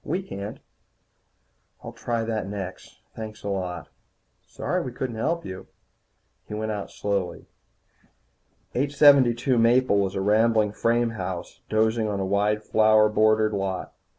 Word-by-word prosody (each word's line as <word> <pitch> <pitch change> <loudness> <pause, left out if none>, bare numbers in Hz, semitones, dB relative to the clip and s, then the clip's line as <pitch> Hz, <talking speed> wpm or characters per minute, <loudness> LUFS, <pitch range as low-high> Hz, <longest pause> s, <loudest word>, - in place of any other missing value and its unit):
We 180 +6 -2
can't." 100 - -7 1.3
"I'll - - -7
try 115 -1 -2
that 110 -3 -3
next. 95 -2 -7 0.2
Thanks 110 -1 -8
a 100 - -3
lot." 90 -3 -4 0.6
"Sorry - - -2
we 130 - -5
couldn't 120 -2 -4
help 170 +8 -1
you." 95 0 -8 0.8
He 105 - -6
went 110 0 -2
out 105 -2 -4
slowly. 100 -3 -3 1.3
872 135 -3 +4
Maple 115 -2 +4
was 95 0 -1
a 95 - -1
rambling 110 +1 +3
frame 115 +2 +1
house 95 -5 -6
dozing 110 +1 +1
on 100 -2 -2
a 95 - -1
wide 105 +2 +1
flower 110 0 +4
bordered 110 0 +3
lot. 95 -2 -3
110 Hz, 135 wpm, -25 LUFS, 100-115 Hz, 1.3 s, 872